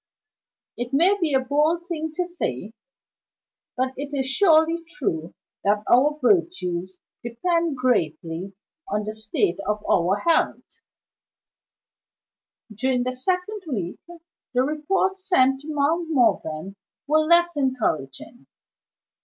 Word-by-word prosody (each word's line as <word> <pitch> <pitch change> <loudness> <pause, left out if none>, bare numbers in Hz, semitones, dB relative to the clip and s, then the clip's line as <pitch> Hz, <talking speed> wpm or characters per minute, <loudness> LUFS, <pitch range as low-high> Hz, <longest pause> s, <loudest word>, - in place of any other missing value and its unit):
It 245 +2 -4
may 350 +8 +4
be 315 -6 +1
a - - +5
bold 300 +6 +1
thing 320 -3 -4
to 360 - 0
say, 220 - -4 1.0
but 255 +1 0
it 285 +1 -5
is 265 - 0
surely 320 +3 +3
true 165 - -3 0.3
that 205 +1 +2
our 290 +5 +4
virtues 190 - 0 0.3
depend 330 +6 -1
greatly 175 - -1 0.3
on 210 +1 -1
the 215 - -4
state 215 -4 0
of 210 0 -2
our 180 +2 +3
health. 330 -1 0 1.9
During 250 +3 0
the 255 +1 -2
second 365 +10 -2
week, 195 - -4 0.6
the 250 - +4
reports 375 +7 -1
sent 270 -6 +3
to 295 - -13
Mount 315 +3 0
Morven 195 - 0 0.3
were 305 +2 +3
less 340 +2 +3
encouraging. 245 - -2
265 Hz, 115 wpm, -24 LUFS, 210-330 Hz, 1.9 s, a